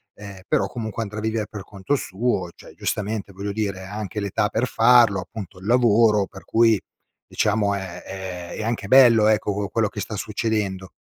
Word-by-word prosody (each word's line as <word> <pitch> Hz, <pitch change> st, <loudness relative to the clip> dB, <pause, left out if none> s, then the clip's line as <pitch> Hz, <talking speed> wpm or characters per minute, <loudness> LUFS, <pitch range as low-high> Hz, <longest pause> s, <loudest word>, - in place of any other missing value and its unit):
ehm, 100 Hz, -2 st, -10 dB
però 95 Hz, -, +1 dB
comunque 115 Hz, -1 st, -5 dB
andrà 105 Hz, +1 st, -6 dB
a -, -, -5 dB
vivere 110 Hz, -1 st, -2 dB
per 105 Hz, -3 st, -7 dB
conto 100 Hz, +8 st, -2 dB
suo 95 Hz, -5 st, -2 dB
cioè, -, -, -15 dB
giustamente 105 Hz, -1 st, -3 dB
voglio 100 Hz, +2 st, -4 dB
dire 100 Hz, -3 st, -3 dB
ha 100 Hz, +2 st, -8 dB
anche 105 Hz, -1 st, -4 dB
l'età 100 Hz, 0 st, 0 dB
per 120 Hz, +3 st, 0 dB
farlo, 115 Hz, -4 st, +5 dB
appunto 100 Hz, -3 st, -9 dB
il 95 Hz, -, -12 dB
lavoro 115 Hz, -3 st, +4 dB
per 95 Hz, -, -13 dB
cui 115 Hz, -3 st, +3 dB, 0.5 s
diciamo 105 Hz, -1 st, +1 dB
è 95 Hz, -3 st, -6 dB
è 90 Hz, -2 st, -7 dB
è -, -, -4 dB
anche 110 Hz, -3 st, -2 dB
bello 120 Hz, -4 st, +7 dB
ecco, 105 Hz, -1 st, +2 dB
co 100 Hz, 0 st, -2 dB
quello 110 Hz, -2 st, +1 dB
che 105 Hz, -, -7 dB
sta 105 Hz, +2 st, -5 dB
succedendo. 105 Hz, -3 st, -2 dB
105 Hz, 190 wpm, -23 LUFS, 100-110 Hz, 0.5 s, bello